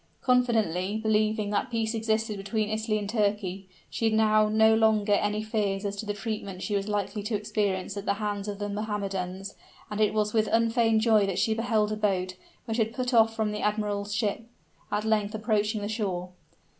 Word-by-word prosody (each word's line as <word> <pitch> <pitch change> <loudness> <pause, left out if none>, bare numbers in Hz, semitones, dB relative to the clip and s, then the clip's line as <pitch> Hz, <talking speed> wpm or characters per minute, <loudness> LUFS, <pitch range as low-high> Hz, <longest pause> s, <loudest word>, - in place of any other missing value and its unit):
Confidently 220 -7 +2
believing 215 -1 +1
that 205 - 0
peace 225 -1 -1
existed 220 -1 0
between 210 +2 -2
Italy 215 0 0
and 205 -1 -3
Turkey, 200 -3 -1 0.2
she 225 - -3
had 220 -1 +3
now 215 -1 +4
no 220 +1 +5
longer 220 -2 +3
any 210 +1 +1
fears 210 -2 -1
as 200 0 -2
to 215 - -5
the 205 - -1
treatment 200 -3 -5
she 210 - -1
was 200 0 -1
likely 205 0 -2
to 210 +2 -2
experience 205 -2 -1
at 200 0 -5
the 200 - +2
hands 205 -1 -3
of 205 -1 -4
the 205 0 -3
Mohammedans; 200 -2 -3 0.4
and 210 +1 -2
it 215 0 +2
was 210 -1 +1
with 220 -1 +2
unfeigned 225 -1 +3
joy 215 -3 +4
that 190 -2 -2
she 220 +3 +2
beheld 220 -2 +1
a - - 0
boat, 185 -3 0 0.3
which 225 -1 -2
had 225 0 0
put 255 -1 -2
off 225 -1 +5
from 220 -1 0
the 210 - -4
admiral's 210 -1 -1
ship, 210 0 -1 0.5
at 210 +1 -1
length 215 -1 +1
approaching 215 0 0
the 205 - -3
shore. 195 -5 -2
210 Hz, 195 wpm, -27 LUFS, 200-220 Hz, 0.5 s, no